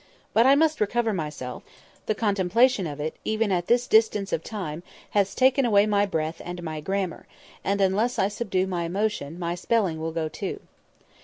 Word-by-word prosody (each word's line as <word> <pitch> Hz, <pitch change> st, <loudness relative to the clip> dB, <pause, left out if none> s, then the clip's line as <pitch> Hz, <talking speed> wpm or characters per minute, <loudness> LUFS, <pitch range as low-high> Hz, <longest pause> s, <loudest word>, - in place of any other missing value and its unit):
But 230 Hz, +3 st, +5 dB
I 275 Hz, -, +7 dB
must 310 Hz, -1 st, +2 dB
recover 225 Hz, +1 st, +1 dB
myself; 150 Hz, -7 st, -5 dB, 0.5 s
the 215 Hz, -, +1 dB
contemplation 205 Hz, +1 st, +2 dB
of 145 Hz, -1 st, -7 dB
it, 155 Hz, +2 st, -4 dB
even 220 Hz, -1 st, 0 dB
at 175 Hz, -2 st, 0 dB
this 240 Hz, +1 st, +3 dB
distance 220 Hz, -4 st, +2 dB
of 160 Hz, -, -1 dB
time, 175 Hz, -7 st, -5 dB, 0.3 s
has 200 Hz, -2 st, +1 dB
taken 265 Hz, +1 st, +4 dB
away 205 Hz, -4 st, +4 dB
my 205 Hz, -1 st, +2 dB
breath 160 Hz, -2 st, -3 dB
and 175 Hz, 0 st, -6 dB
my 155 Hz, -2 st, -4 dB
grammar, 190 Hz, +1 st, -3 dB, 0.4 s
and 200 Hz, +1 st, 0 dB
unless 205 Hz, +6 st, +1 dB
I 195 Hz, -, +3 dB
subdue 200 Hz, -3 st, -1 dB
my 175 Hz, -3 st, -2 dB
emotion, 175 Hz, -4 st, -2 dB
my 170 Hz, -1 st, -2 dB
spelling 185 Hz, -2 st, 0 dB
will 165 Hz, 0 st, -2 dB
go 160 Hz, -1 st, -2 dB
too. 190 Hz, +5 st, -5 dB
195 Hz, 180 wpm, -25 LUFS, 170-220 Hz, 0.5 s, I